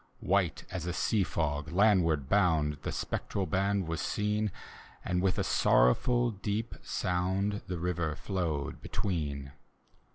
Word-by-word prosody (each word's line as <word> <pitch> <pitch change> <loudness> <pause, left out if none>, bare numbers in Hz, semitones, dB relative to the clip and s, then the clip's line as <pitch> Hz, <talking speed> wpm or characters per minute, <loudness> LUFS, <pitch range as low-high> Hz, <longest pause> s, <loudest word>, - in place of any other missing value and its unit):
White 95 -5 +1
as 90 -2 -4
a 90 - -1
sea 95 +3 +1
fc%, 75 -3 -2
landward 90 -7 +3
bound. 80 -6 +2
The - - -3
spectral 100 - -2
band 100 -1 0
was 80 0 -2
seen. 105 0 0 0.5
And 90 0 0
with 95 -1 +1
a - - +1
sorrowful 120 - +3
deep 105 +2 -3
sound. 95 +3 -1
The 90 - -3
river 85 -3 -1
flowed 80 -8 -3
between. 70 -8 -3
90 Hz, 130 wpm, -31 LUFS, 80-100 Hz, 0.5 s, landward